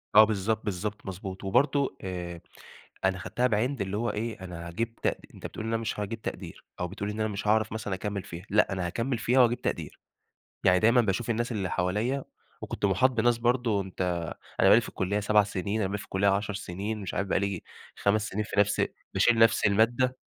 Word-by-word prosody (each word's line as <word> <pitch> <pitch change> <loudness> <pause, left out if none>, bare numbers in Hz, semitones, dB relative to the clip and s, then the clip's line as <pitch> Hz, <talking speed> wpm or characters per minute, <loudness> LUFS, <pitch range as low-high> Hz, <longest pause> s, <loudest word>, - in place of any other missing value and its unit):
آه 110 - +11
بالضبط، 110 +1 0
بالضبط، 105 +1 -3
مضبوط. 95 0 -6
وبرضه 135 +4 +2
آآ 90 -2 -5 0.6
أنا 95 0 +2
خدتها 125 +6 0
بعِند 120 +2 0
اللي 100 +1 -2
هو 120 +1 0
إيه 110 0 -3
أنا 85 -2 -7
هاجيب 115 +7 -3
تق - - -1 0.2
أنت - - -11
بتقول 110 - -7
إن 115 - -2
أنا 115 - 0
مش 110 - -3
هاجيب 110 +2 -4
تقدير، - - -7
أو 90 - -1
بتقول 100 +3 -4
إن 105 - -5
أنا 110 0 +1
مش 100 0 -4
هاعرف 110 +1 +3
مثلًا 105 -3 -3
أكمِل 100 0 -3
فيها، 85 +3 -9
لأ، 105 0 +3
أنا 95 -2 -2
هاكمِل 115 +7 -1
فيها 125 +3 +2
وهاجيب 120 -1 +4
تقدير. - - -3 0.7
يعني 90 0 +6
دايمًا 115 +4 +5
باشوف 110 +2 -1
الناس 120 +2 0
اللي 95 -4 -2
حواليَّ 105 +10 0 0.4
وكنت - - -4
مُحاط 125 +7 +4
بناس 120 0 +2
برضه 120 -3 +1
أنت 95 -1 -11 0.6
أنا - - +6
بقى - - +9
لي - - +5
في - - -8
الكُلية 100 +3 -1
7 105 +1 +4
سنين، 100 +2 -2
أنا 100 - +1
بقى 95 - -4
لي 105 - -1
في - - -8
الكُلية 95 +1 +1
10 100 +2 +1
سنين، 100 +3 -4
مش 95 - -5
عارف 100 - -1
بقى - - +2
لي 100 -2 -2 0.3
5 105 +1 +1
سنين 105 +2 -2
في 100 - +1
نفس 105 0 +2 0.3
باشيل 120 -1 +4
نفس 115 -1 +5
المادة. 120 +5 +3
105 Hz, 215 wpm, -28 LUFS, 95-115 Hz, 0.7 s, آه